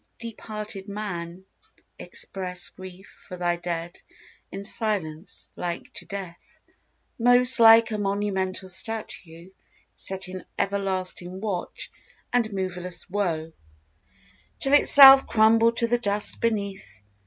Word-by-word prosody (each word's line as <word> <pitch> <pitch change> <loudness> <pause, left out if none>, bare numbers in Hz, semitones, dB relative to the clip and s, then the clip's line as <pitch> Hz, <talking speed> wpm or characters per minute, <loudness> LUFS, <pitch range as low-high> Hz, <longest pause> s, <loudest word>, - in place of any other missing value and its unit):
Deep 230 -2 -9
hearted 210 -2 -6
man, 190 -3 -6 0.5
express 180 -2 -5
Grief 185 +1 -13
for 180 - -8
thy 175 -1 0
Dead 170 0 -5 0.5
in 195 - -6
silence 195 -6 -3
like 175 -1 -5
to - - -8
death: 190 -4 -9 0.6
Most 245 +1 +5
like 225 0 +7
a 215 - -2
monumental 195 -2 -2
statue 185 -3 -6 0.4
set 190 0 -6
In 185 0 -8
everlasting 185 -2 -2
watch 195 -4 -4 0.4
and 235 -3 +1
moveless 180 -2 -5
woe, 165 -5 -2 1.1
Till 275 - +1
itself 270 -2 +8
crumble 225 +1 +4
to 235 0 +1
the 240 +1 +1
dust 205 -2 -3
beneath. 200 - -3
195 Hz, 110 wpm, -25 LUFS, 180-220 Hz, 1.1 s, itself